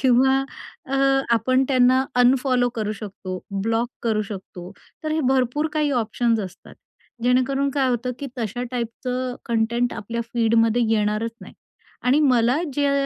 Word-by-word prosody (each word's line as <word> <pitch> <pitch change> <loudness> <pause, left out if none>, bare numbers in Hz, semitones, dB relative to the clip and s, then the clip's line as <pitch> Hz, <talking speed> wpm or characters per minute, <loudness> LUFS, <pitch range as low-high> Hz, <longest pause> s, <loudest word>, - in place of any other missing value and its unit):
किंवा 265 +1 +4 0.5
अ, 270 - -3 0.4
आपण 255 +4 +2
त्यांना 255 0 +4 0.2
अनफॉलो 250 0 +3
करू 215 -2 -2
शकतो, 195 -3 -7 0.2
ब्लॉक 225 +2 0
करू 220 -2 +1
शकतो. 190 -3 -9 0.3
तर 310 - -1
हे 315 - +1
भरपूर 260 +4 +1
काही 305 -1 +1
ऑप्शन 235 -2 +1
असतात. 185 +1 -12 0.5
जेणेकरून 260 +3 +2
काय 270 -2 +2
होतं, 250 0 -1
की 285 - -5
तशा 230 +1 -3
टाइपचं 250 +1 -3
कंटेंट 235 +1 0
आपल्या 235 +3 -4
फीडमध्ये 230 0 +3
येणारच 215 +1 +1
नाही. - - -12 0.5
आणि 255 +4 +4
मला 250 -3 +3 0.2
ज्या 285 -1 +2
245 Hz, 140 wpm, -23 LUFS, 225-260 Hz, 0.5 s, किंवा